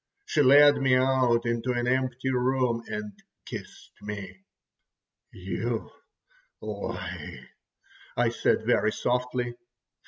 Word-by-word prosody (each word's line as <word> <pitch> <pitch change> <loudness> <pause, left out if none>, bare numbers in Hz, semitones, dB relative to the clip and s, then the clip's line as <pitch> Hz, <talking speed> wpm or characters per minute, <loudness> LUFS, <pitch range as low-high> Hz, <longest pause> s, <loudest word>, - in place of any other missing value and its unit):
She 150 - +1
led 145 +2 +7
me 130 -1 +3
out 130 -2 +2
into 120 +2 -1
an 120 0 -1
empty 130 0 0
room 125 -2 +1
and 105 0 -5 0.3
kissed - - -9
me. 105 - -7 0.9
"You - - -4 0.7
lie," - - -6 0.7
I 120 - +3
said 115 -1 0
very 110 -2 +3
softly. 125 0 -1
125 Hz, 100 wpm, -27 LUFS, 120-130 Hz, 0.9 s, led